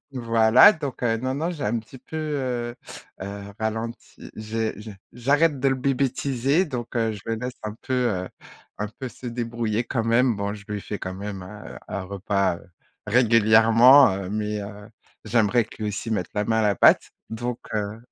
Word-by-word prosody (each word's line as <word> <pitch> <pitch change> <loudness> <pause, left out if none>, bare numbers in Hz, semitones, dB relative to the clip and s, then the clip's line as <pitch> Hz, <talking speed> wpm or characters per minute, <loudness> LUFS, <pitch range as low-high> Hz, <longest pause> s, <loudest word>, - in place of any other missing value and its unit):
voilà, 115 - +6
donc 145 -9 -6
heu, 115 -2 +1
non, 130 +3 -2
non, 160 +5 -2
j'ai 155 -8 -5
un 115 +3 0
petit 115 +4 -12
peu, 160 - -9
heu, 130 -6 -2 0.5
heu, 100 +1 -7
ralenti, 110 +1 -5
j'ai 110 +1 -3
j'ai 105 -1 -9 0.2
j'arrête 145 +4 +2
de 135 - +3
le 135 - +2
bébétiser, 135 +3 0
donc 125 -7 -5
heu, 115 -1 +1
je 105 - -8
le 115 - -1
laisse 125 +3 -4
un 105 0 -4
peu, 130 - -5
heu, 115 -8 0 0.5
un 105 - -2
peu 130 +4 -8
se 125 - -11
débrouiller 115 -1 -2
quand 115 -3 -2
même. 115 +1 +3
Bon, 100 0 -3
je 105 -1 -12
lui 105 -2 -4
fais 105 +1 -6
quand 90 - -5
même, 100 -1 -6
heu, 105 +3 -10
un 100 - -3
repas, 100 -1 -1
heu, - - -16 0.4
régulièrement, 115 +3 +6
heu, 95 -1 -5
mais 105 0 -2
heu, 105 +1 -10 0.4
j'aimerais 115 +1 +2
que - - -14
lui 105 - -1
aussi 105 +2 -5
mette 100 -5 -1
la 105 0 -1
main 110 -1 +2
à - - +1
la 105 -1 +2
pâte. - - +5 0.2
Donc 120 +2 -4 0.2
heu 105 0 -2
115 Hz, 190 wpm, -24 LUFS, 105-125 Hz, 0.5 s, voilà